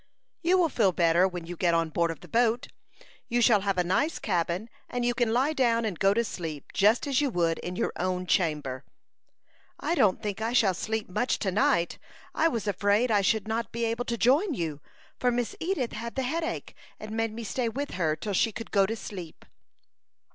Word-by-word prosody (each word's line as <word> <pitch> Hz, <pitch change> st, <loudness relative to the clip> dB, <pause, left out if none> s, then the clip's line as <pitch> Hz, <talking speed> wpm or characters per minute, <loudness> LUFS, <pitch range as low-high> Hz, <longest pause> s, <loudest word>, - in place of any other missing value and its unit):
"You 360 Hz, +2 st, +3 dB
will 345 Hz, -3 st, +3 dB
feel 215 Hz, -8 st, +2 dB
better 170 Hz, +1 st, +3 dB
when 175 Hz, -2 st, -6 dB
you 175 Hz, +1 st, -6 dB
get 170 Hz, -1 st, +2 dB
on 165 Hz, -1 st, +1 dB
board 170 Hz, +1 st, +1 dB
of 165 Hz, -, -6 dB
the -, -, -12 dB
boat. 235 Hz, 0 st, +1 dB, 0.6 s
You 240 Hz, 0 st, +1 dB
shall 230 Hz, -4 st, +5 dB
have 195 Hz, -1 st, -1 dB
a 180 Hz, -, +3 dB
nice 235 Hz, -, +1 dB
cabin, 180 Hz, +1 st, -1 dB, 0.2 s
and 245 Hz, -1 st, -2 dB
you 245 Hz, -, +2 dB
can 240 Hz, -2 st, +1 dB
lie 265 Hz, +6 st, +2 dB
down 235 Hz, -5 st, +2 dB
and 195 Hz, -7 st, -3 dB
go 195 Hz, 0 st, +4 dB
to 235 Hz, -, +2 dB
sleep 165 Hz, -, -6 dB
just 215 Hz, +7 st, +3 dB
as 280 Hz, -1 st, +1 dB
you 285 Hz, -, +1 dB
would 170 Hz, -6 st, 0 dB
in 180 Hz, -, -5 dB
your -, -, -1 dB
own 185 Hz, 0 st, -1 dB
chamber." 150 Hz, -7 st, 0 dB, 1.0 s
"I -, -, -1 dB
don't 210 Hz, -, +3 dB
think 210 Hz, -1 st, -4 dB
I 225 Hz, +2 st, -1 dB
shall 210 Hz, -6 st, +4 dB
sleep 220 Hz, +4 st, -3 dB
much 245 Hz, +7 st, 0 dB
to 195 Hz, -, -1 dB
night. 175 Hz, -3 st, +1 dB, 0.3 s
I 325 Hz, -, +3 dB
was 235 Hz, -10 st, -2 dB
afraid 205 Hz, +4 st, +2 dB
I 205 Hz, -2 st, +4 dB
should 215 Hz, +2 st, +1 dB
not 225 Hz, +1 st, -2 dB
be 235 Hz, 0 st, -1 dB
able 230 Hz, +2 st, -1 dB
to 235 Hz, -, -2 dB
join 285 Hz, -, +3 dB
you, 155 Hz, -6 st, -3 dB, 0.4 s
for 250 Hz, -, +2 dB
Miss 240 Hz, -2 st, -1 dB
Edith 325 Hz, -9 st, -1 dB
had 235 Hz, +2 st, -6 dB
the 265 Hz, -, -1 dB
headache, 325 Hz, +6 st, -3 dB, 0.3 s
and 215 Hz, 0 st, -8 dB
made 225 Hz, 0 st, -1 dB
me 230 Hz, +2 st, -6 dB
stay 235 Hz, +2 st, -1 dB
with 280 Hz, +5 st, -4 dB
her 160 Hz, -4 st, 0 dB
till 205 Hz, +5 st, -4 dB
she 225 Hz, +4 st, +2 dB
could 230 Hz, +2 st, -8 dB
go 195 Hz, -2 st, +4 dB
to 225 Hz, -, -2 dB
sleep." 180 Hz, -7 st, -9 dB
220 Hz, 215 wpm, -28 LUFS, 180-240 Hz, 1.0 s, shall